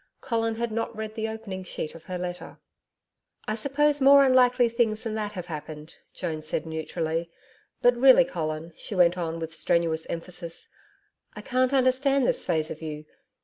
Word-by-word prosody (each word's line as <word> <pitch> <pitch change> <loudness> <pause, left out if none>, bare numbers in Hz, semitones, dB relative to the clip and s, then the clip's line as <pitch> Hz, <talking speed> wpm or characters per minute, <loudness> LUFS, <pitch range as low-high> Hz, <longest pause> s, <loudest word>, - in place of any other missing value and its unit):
Colin 225 -1 -1
had 235 0 -2
not 230 +1 -3
read 215 0 -5
the 220 0 -3
opening 220 -4 -6
sheet 160 -3 -5
of 165 0 -13
her 185 - -4
letter. 180 0 -6 0.9
'I 215 - 0
suppose 285 +5 +1
more 275 +1 +8
unlikely 250 -1 +5
things 225 -2 0
than 225 - -3
that 210 -1 -3
have 180 -3 -6
happened,' 155 -1 -8
Joan 160 -4 -4
said 155 +1 -3
neutrally. 160 +1 -3 0.5
'But 245 0 +6
really, 260 +1 +7
Colin,' 160 -7 -4
she 210 - -6
went 175 -1 +4
on 165 -2 -3
with 160 0 -5
strenuous 165 -1 0
emphasis, 170 0 -6 0.7
'I - - -7
can't 255 0 +1
understand 265 +1 +3
this - - 0
phase 160 -3 -1
of - - -7
you. 155 -1 -6
190 Hz, 170 wpm, -26 LUFS, 165-245 Hz, 0.9 s, more